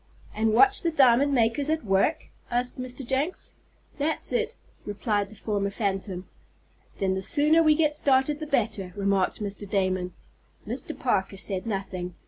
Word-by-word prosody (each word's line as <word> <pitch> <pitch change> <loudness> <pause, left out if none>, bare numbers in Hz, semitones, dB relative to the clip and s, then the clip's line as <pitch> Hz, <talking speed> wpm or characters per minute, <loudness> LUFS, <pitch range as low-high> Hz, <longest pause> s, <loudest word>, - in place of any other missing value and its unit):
"And 220 0 +1
watch 400 - +5
the 340 - +1
diamond 275 -2 +4
makers 250 +3 +2
at 315 -5 -1
work?" 195 +11 +1 0.2
asked 245 +1 -1
Mr. 255 +1 -6
Jenks. 275 +8 -2 0.5
"That's 305 +3 +1
it," 460 -1 -1 0.3
replied 205 -1 -2
the 215 - -13
former 200 -1 -2
phantom. 195 -3 -3 0.7
"Then 190 -1 0
the 190 - -2
sooner 300 - +4
we 310 -2 +4
get 300 -1 +1
started 280 0 +2
the 310 - -5
better," 215 -9 -1
remarked 200 0 0
Mr. 200 0 -6
Damon. 185 -2 -1 0.5
Mr. - - -5
Parker 195 0 -1
said 190 0 -2
nothing. 190 -4 -4
225 Hz, 150 wpm, -26 LUFS, 195-290 Hz, 0.7 s, watch